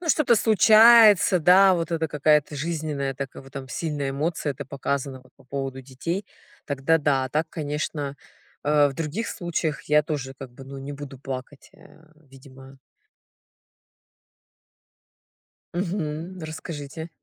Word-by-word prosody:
Ну, 345 - -6
что-то 295 -5 +4
случается, 215 -2 +6
да, 185 +3 +6
вот 170 -1 -2
это 160 -1 0
какая-то 150 0 +2
жизненная 150 -3 -3
такая 135 0 -7
вот 135 - -16
там 135 -2 -7
сильная 145 0 -3
эмоция. 150 +1 -2
Это 140 +1 -8
показано 135 0 -3
вот 130 - -24
по - - -21
поводу 135 0 -5
детей, 140 +9 -5 0.4
тогда 140 +3 +1
да. 140 -3 +1
А 130 - -5
так, 155 +4 -1
конечно, 150 -2 -4 0.5
э, 145 0 +4
в 135 - -6
других 165 +10 -3
случаях 165 -5 -3
я 150 0 +3
тоже, 140 -3 -4
как 135 -2 -9
бы, 135 +2 -12
ну, 135 +1 -9
не 140 +2 -7
буду 140 -1 -9
плакать, 135 +1 -8
э, 160 - -19
видимо. 135 -2 -16 3.0
Мгм. 175 -1 -3
Расскажите. 155 0 -7
150 Hz, 140 wpm, -24 LUFS, 135-165 Hz, 3.0 s, случается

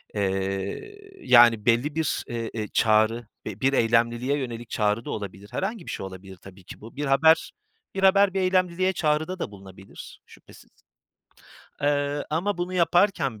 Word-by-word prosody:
Eee, 100 - -3
yani, 120 -3 +6
belli 125 +6 +1
bir, 160 -2 -1
e 115 -1 -4
eee, 110 -2 -4
çağrı 110 +1 +2 0.2
ve 105 -1 -7
bir 135 +1 +2
eylemliliğe 120 +3 +1
yönelik 120 -4 -6
çağrı 105 +2 -1
da - - -7
olabilir. 100 0 -7
Herhangi 195 -1 -4
bir - - -6
şey - - -5
olabilir 95 0 -11
tabii 95 +1 -15
ki - - -12
bu. 115 +4 -12
Bir 145 +1 -3
haber 160 +4 +3 0.4
bir 195 - -3
haber, 195 0 +5
bir 195 - 0
eylemliliğe 185 0 +1
çağrıda 160 +2 -1
da 105 - -4
bulunabilir, 95 -1 -13
şüphesiz. - - -18 1.1
Eee, 145 0 0
ama 175 +5 -1
bunu 175 +1 -3
yaparken 175 - +1
125 Hz, 155 wpm, -25 LUFS, 105-170 Hz, 1.1 s, yani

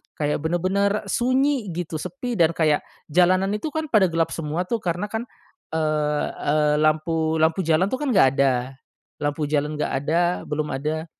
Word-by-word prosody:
kayak 150 0 -1
bener-bener 190 +5 0
sunyi 255 0 +1
gitu 165 -3 -4
sepi 245 - -5
dan 165 0 +4
kayak 155 -3 +2 0.3
jalanan 185 +3 +3
itu 210 +8 -3
kan 315 0 -2
pada 205 -4 +5
gelap 165 -1 0
semua 165 +2 -2
tuh 235 +5 -1
karena 175 +3 -2
kan, 225 +1 -2 0.5
eee 150 -2 0
eee, 150 0 +1
lampu 160 +1 +1
lampu 160 +4 +2
jalan 165 +4 +3
tuh 260 - 0
kan 295 - -1
nggak 190 -9 +6
ada, 130 -1 +1 0.5
lampu 145 +1 -1
jalan 150 0 0
nggak 150 - -2
ada, 165 +3 +2 0.3
belum 150 0 -2
ada 155 +4 -2
160 Hz, 165 wpm, -23 LUFS, 150-195 Hz, 0.5 s, nggak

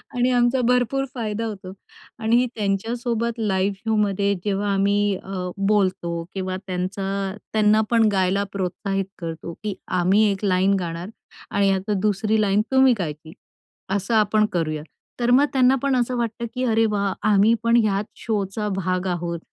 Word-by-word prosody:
आणि 245 +1 +2
आमचा 245 +1 +2
भरपूर 250 +2 +2
फायदा 225 -1 -3
होतो. 195 -3 -6 0.5
आणि 235 +3 +3
त्यांच्यासोबत 230 +3 -2
लाईव्ह 195 -2 0
शोमध्ये 200 -2 +1
जेव्हा 200 0 0
आम्ही 200 0 +2
अ, 185 -2 -4
बोलतो 190 -4 0
किंवा 185 -1 -3
त्यांचा 195 +2 -3 0.2
त्यांना 215 0 +4
पण 225 -2 +4
गायला 190 +1 +1
प्रोत्साहित 195 +1 -2
करतो 165 0 -6
की 210 -2 -2 0.3
"आम्ही 195 +5 +4
एक 195 +1 -3
लाईन 190 +1 +3
गाणार 170 +2 -5 0.4
आणि 200 -1 +2
आता 195 +2 -1
दुसरी 215 +1 +1
लाईन 205 0 +3
तुम्ही 265 -1 +5
गायची, 155 -1 -5 0.6
असं 200 +3 -1
आपण 215 0 +3
करूया." 155 -3 -1 0.4
तर 240 0 +1
मग 290 - +5
त्यांना 260 0 +4
पण 275 -2 +2
असं 245 0 0
वाटतं 235 0 -2
की 255 - -1
"अरे 225 -2 +3
वाह! 200 -1 0 0.2
आम्ही 210 +2 +5
पण 230 0 +3
ह्याच 200 0 0
शोचा 210 -1 -2
भाग 185 0 -1
आहोत 170 -1 -2
200 Hz, 150 wpm, -23 LUFS, 190-225 Hz, 0.6 s, तुम्ही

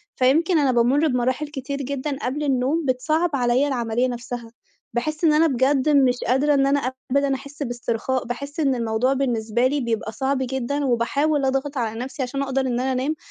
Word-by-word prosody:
فيمكن 320 +7 +3
أنا 275 -3 +3
بامُّر 255 +6 +3
بمراحل 255 +3 0
كتير 280 -1 -5
جدًا 280 +1 -3
قبل 275 +4 -2
النوم، 280 +3 0
بتصَعَّب 310 +7 +1
عليّا 250 +2 +2
العملية 240 -2 0
نفسها، 240 -1 -6 0.4
باحِسّ 305 +7 -2
إن 315 -2 +5
أنا 315 +2 +4
بجد 270 +1 +2
مش 265 -4 +4
قادرة 270 +4 +3
إن 275 -1 +3
أنا 275 -2 +1 0.2
أبدًا 280 0 +2
أحِسّ 280 +2 -7
باسترخاء، 245 0 -2
باحِسّ 280 +5 -6
إن 275 -4 +2
الموضوع 230 +2 +1
بالنسبة 240 -3 0
لي 285 +2 -1
بيبقى 225 -2 -2
صعب 270 +4 -1
جدًا، 265 +2 -2
وباحاول 275 +4 +1
أضغط 270 +2 -1
على 225 -2 -2
نفسي 265 +2 -4
عشان 275 +2 -3
أقدر 270 0 0
إن 250 -2 -1
أنا 265 +1 0
أنام، 265 +5 -1
265 Hz, 180 wpm, -23 LUFS, 245-285 Hz, 0.4 s, إن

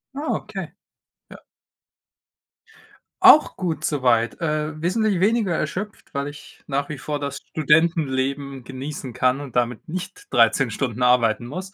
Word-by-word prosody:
Ah, 295 +3 -2
okay. - - -6 0.6
Ja. - - -11 1.8
Auch 375 -5 +7
gut 165 -5 -3
soweit. 120 -6 +1
Äh, 155 -1 -2
wesentlich 200 +2 +1
weniger 210 -1 +2
erschöpft, 185 +7 -4
weil 140 +1 -2
ich 145 0 -14
nach 140 0 -1
wie 150 - -6
vor 145 +2 -4
das 140 -1 -4
Studentenleben 140 -4 +1
genießen 135 +1 -6
kann 130 +3 +1
und 135 -4 -5
damit 125 +7 -1
nicht 295 - -6
13 - - +4
Stunden 125 -3 -2
arbeiten 120 -2 +3
muss. 185 +9 -7
145 Hz, 135 wpm, -23 LUFS, 130-175 Hz, 1.8 s, Auch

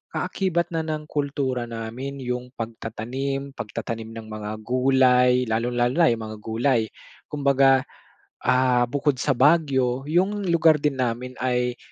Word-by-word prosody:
kaakibat 175 -3 -1
na 165 - -1
ng 155 -1 -4
kultura 140 -4 -1
namin 115 +5 -6
yung 125 0 -4
pagtatanim, 120 +5 -4
pagtatanim 115 +1 -5
ng 110 -1 -8
mga 105 0 -5
gulay, 125 0 +4
lalong 115 +2 -1
lalo 120 +3 +2
na 165 -5 +6
yung 115 -1 -2
mga 110 0 -7
gulay. 115 +2 +1 0.5
Kumbaga, 135 -2 +4 0.6
ah, 125 -1 +3
bukod 145 0 0
sa 145 - +1
Baguio 135 -4 +3
yung 190 +5 +1
lugar 160 -3 +4
din 145 -3 0
namin 125 0 -2
ay, 125 -1 0
130 Hz, 135 wpm, -24 LUFS, 120-140 Hz, 0.6 s, na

